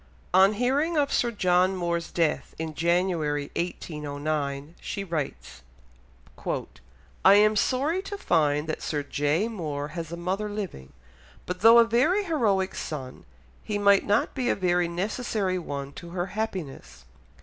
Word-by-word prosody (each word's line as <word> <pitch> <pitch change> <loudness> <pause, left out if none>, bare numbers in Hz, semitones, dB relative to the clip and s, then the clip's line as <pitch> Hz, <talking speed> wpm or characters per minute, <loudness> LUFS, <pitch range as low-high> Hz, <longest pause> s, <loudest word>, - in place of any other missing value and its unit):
On 190 +3 +6
hearing 275 +9 +1
of 285 -1 +1
Sir 240 - +2
John 185 -3 +2
Moore's 170 -1 -2
death 160 -5 -1
in 160 -1 -4
January 165 -3 0
1809, 150 -3 -3
she 200 - -4
writes: 150 - -5 1.6
"I 195 - +8
am 215 +1 +5
sorry 280 - +1
to 400 +1 -6
find 150 - +1
that 155 - -3
Sir 145 -2 -2
J. 145 +8 0
Moore 150 -9 -4
has 165 -1 -6
a 170 - -5
mother 190 +5 -2
living, 195 - -6 0.5
but 180 0 -4
though 225 +2 +8
a 235 - +8
very 265 - +2
heroic 215 - +1
son, 130 -5 -6 0.4
he 210 - -2
might 200 -1 +5
not 205 +2 +1
be 255 -2 -1
a - - +2
very 180 -2 +1
necessary 190 +1 -2
one 140 -4 -6
to 170 - -10
her 175 0 -2
happiness.... 155 - -5
180 Hz, 145 wpm, -26 LUFS, 155-215 Hz, 1.6 s, I